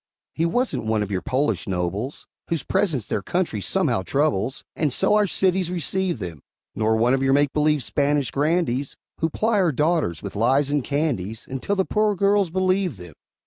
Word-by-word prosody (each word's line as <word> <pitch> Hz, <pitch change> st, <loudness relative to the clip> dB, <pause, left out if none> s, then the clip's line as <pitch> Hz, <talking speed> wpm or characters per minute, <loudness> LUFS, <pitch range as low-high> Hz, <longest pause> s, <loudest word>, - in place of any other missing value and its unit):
He 165 Hz, +1 st, 0 dB
wasn't 245 Hz, -, -1 dB
one 110 Hz, -1 st, +1 dB
of 105 Hz, -, -6 dB
your 95 Hz, -2 st, -1 dB
Polish 135 Hz, 0 st, -1 dB
nobles, 95 Hz, +8 st, -3 dB, 0.2 s
Whose 165 Hz, -2 st, -2 dB
presence 145 Hz, -, 0 dB
their 105 Hz, -, -2 dB
country 170 Hz, -, -1 dB
somehow 95 Hz, -, +1 dB
troubles, 135 Hz, +1 st, -1 dB
And 150 Hz, -4 st, 0 dB
so 170 Hz, -, +2 dB
our 210 Hz, -1 st, +4 dB
cities 185 Hz, -1 st, +1 dB
receive 180 Hz, 0 st, -1 dB
them; 85 Hz, -, -7 dB, 0.3 s
Nor 110 Hz, 0 st, +1 dB
one 120 Hz, +3 st, +3 dB
of 135 Hz, -, +1 dB
your 135 Hz, 0 st, +3 dB
make 145 Hz, 0 st, +2 dB
believe 150 Hz, -2 st, +2 dB
Spanish 145 Hz, -4 st, 0 dB
grandees, 145 Hz, -3 st, 0 dB, 0.2 s
Who 160 Hz, -, +1 dB
ply 220 Hz, +5 st, +1 dB
our 180 Hz, -4 st, +3 dB
daughters 150 Hz, -, 0 dB
with 100 Hz, -, -6 dB
lies 135 Hz, +6 st, +2 dB
and 145 Hz, -2 st, +1 dB
candies 120 Hz, -, -2 dB
Until 135 Hz, +10 st, -2 dB
the 190 Hz, -1 st, +1 dB
poor 210 Hz, -1 st, +1 dB
girls 200 Hz, 0 st, +2 dB
believe 185 Hz, -, 0 dB
them. 90 Hz, -3 st, -11 dB
145 Hz, 185 wpm, -23 LUFS, 110-180 Hz, 0.3 s, our